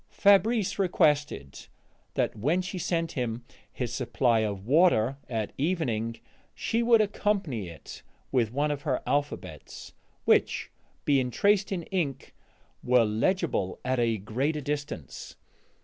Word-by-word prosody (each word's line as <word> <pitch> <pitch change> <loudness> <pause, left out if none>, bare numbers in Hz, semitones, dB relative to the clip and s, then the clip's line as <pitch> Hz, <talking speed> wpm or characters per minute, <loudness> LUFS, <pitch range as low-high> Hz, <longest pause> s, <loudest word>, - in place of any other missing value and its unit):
Fabrice 200 +1 +3
requested 150 - +1 0.5
that - - 0
when 150 - +1
she 185 0 -5
sent 165 -1 -1
him 120 -2 -3 0.3
his - - -4
supply 120 -3 +1
of 100 -3 -2
water 135 -3 +4
at 110 -4 -3
evening 120 -9 -1 0.4
she 230 - 0
would 230 -1 +5
accompany 195 - -1
it 85 - -11 0.3
with 120 -5 +1
one 145 +4 0
of 145 -1 -3
her 140 -4 -1
alphabets, 145 +1 -3 0.3
which, - - +2 0.3
being 135 -4 +2
traced 200 - +2
in 180 -3 -2
ink, 155 -8 -2 0.5
were 125 -2 +4
legible 110 - 0
at 130 0 +1
a 115 -2 +2
greater 130 +10 -1
distance. 145 - -5
140 Hz, 125 wpm, -28 LUFS, 115-180 Hz, 0.5 s, would